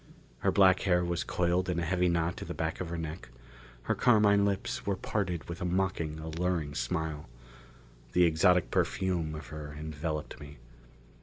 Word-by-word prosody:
Her -, -, +2 dB
black 95 Hz, -2 st, +5 dB
hair 90 Hz, -2 st, +2 dB
was 85 Hz, 0 st, -1 dB
coiled 90 Hz, +1 st, 0 dB
in 90 Hz, -, 0 dB
a 85 Hz, -, 0 dB
heavy 90 Hz, +1 st, +2 dB
knot 85 Hz, 0 st, 0 dB
at -, -, -6 dB
the -, -, -5 dB
back 80 Hz, +2 st, -2 dB
of 90 Hz, -, -4 dB
her 85 Hz, -, -3 dB
neck; 80 Hz, -2 st, -6 dB, 0.5 s
her -, -, +1 dB
carmine 105 Hz, -4 st, +4 dB
lips 100 Hz, -1 st, -2 dB
were 100 Hz, -, 0 dB
parted 90 Hz, -4 st, -2 dB
with 85 Hz, +1 st, -6 dB
a -, -, -1 dB
mocking, 90 Hz, -4 st, -1 dB
alluring 80 Hz, -1 st, -2 dB
smile. 75 Hz, +2 st, -3 dB, 0.8 s
The 90 Hz, -, +5 dB
exotic 90 Hz, +2 st, +3 dB
perfume 85 Hz, -5 st, 0 dB
of 75 Hz, -5 st, -8 dB
her 75 Hz, -1 st, -7 dB
enveloped 75 Hz, 0 st, -4 dB
me. 75 Hz, 0 st, -11 dB
85 Hz, 170 wpm, -30 LUFS, 80-90 Hz, 0.8 s, black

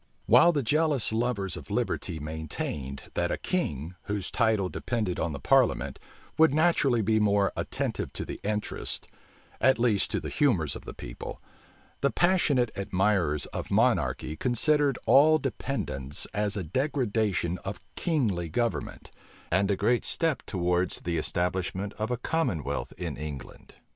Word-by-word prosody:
While 125 Hz, +10 st, +7 dB
the 145 Hz, -5 st, 0 dB
jealous 150 Hz, -1 st, +2 dB
lovers 110 Hz, -4 st, -1 dB
of -, -, -9 dB
liberty 80 Hz, -, -1 dB
maintained, 75 Hz, -3 st, -4 dB
that 85 Hz, 0 st, 0 dB
a -, -, -1 dB
king, 85 Hz, -, -2 dB
whose 100 Hz, -2 st, -3 dB
title 110 Hz, -5 st, +2 dB
depended 105 Hz, -2 st, -2 dB
on 85 Hz, -, 0 dB
the 70 Hz, -, -5 dB
parliament, -, -, +2 dB, 0.4 s
would 160 Hz, -3 st, +6 dB
naturally 150 Hz, -8 st, +3 dB
be 110 Hz, +2 st, +2 dB
more 100 Hz, -2 st, +2 dB
attentive -, -, -2 dB
to -, -, -5 dB
the -, -, -6 dB
interests, 105 Hz, 0 st, -3 dB, 0.5 s
at 130 Hz, +3 st, +4 dB
least 115 Hz, -4 st, +2 dB
to -, -, -1 dB
the -, -, -5 dB
humors 100 Hz, -, +2 dB
of -, -, -9 dB
the -, -, -8 dB
people, -, -, -7 dB, 0.6 s
the 140 Hz, -, +3 dB
passionate 145 Hz, -11 st, +2 dB
admirers 95 Hz, -6 st, +1 dB
of -, -, -4 dB
monarchy 75 Hz, -, +1 dB
considered 140 Hz, -, +2 dB
all 155 Hz, +3 st, +6 dB
dependence 120 Hz, -, -3 dB
as 105 Hz, 0 st, -1 dB
a 95 Hz, -, -2 dB
degradation 110 Hz, -, 0 dB
of 100 Hz, +1 st, -6 dB, 0.2 s
kingly 110 Hz, -, 0 dB
government, 115 Hz, +8 st, -2 dB, 0.4 s
and 95 Hz, +3 st, +2 dB
a 100 Hz, -, +3 dB
great 120 Hz, +5 st, +1 dB
step 165 Hz, -6 st, +1 dB
towards 90 Hz, -1 st, 0 dB
the 85 Hz, -1 st, -2 dB
establishment 90 Hz, +3 st, -1 dB
of 110 Hz, +2 st, -1 dB
a 125 Hz, -, -1 dB
commonwealth 115 Hz, -, -1 dB
in -, -, -4 dB
England. 75 Hz, -2 st, -8 dB
105 Hz, 145 wpm, -28 LUFS, 90-130 Hz, 0.6 s, While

